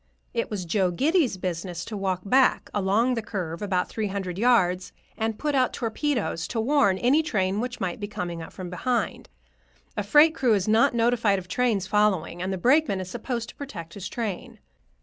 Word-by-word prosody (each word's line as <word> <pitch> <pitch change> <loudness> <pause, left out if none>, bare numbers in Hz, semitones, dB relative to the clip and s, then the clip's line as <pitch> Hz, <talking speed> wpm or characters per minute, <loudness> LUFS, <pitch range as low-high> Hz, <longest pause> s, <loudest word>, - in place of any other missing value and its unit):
It 230 - -1
was 200 -4 -4
Joe 185 +2 +1
Giddy's 275 - +1
business 180 -1 -4
to 220 - -6
walk 190 -2 -1
back 255 +5 +3
along 210 +5 +2
the 230 - -1
curve 180 -6 -5
about 190 -3 0
three 220 -2 -3
hundred 190 -2 -4
yards 185 -7 +2 0.2
and 220 -1 -2
put 300 -1 -1
out 255 -2 +2
torpedoes 230 - -2
to 230 - -3
warn 225 -5 +3
any 260 +10 +3
train 200 -9 0
which 245 0 -4
might 185 0 -3
be 205 - -4
coming 175 -4 -5
up 160 - -9
from 180 -2 -8
behind—a 115 - -5
freight 295 +10 +5
crew 250 -8 +2
is 195 -1 -1
not 225 +2 +4
notified 230 -3 +2
of 185 -1 -7
trains 215 -1 0
following, 190 -4 +1
and 185 +1 -2
the 190 - -2
brakeman 250 - +3
is 185 -1 -6
supposed 235 0 -4
to - - -12
protect 170 - -8
his 195 -1 -6
train. 215 -6 -4
205 Hz, 190 wpm, -25 LUFS, 185-240 Hz, 0.2 s, freight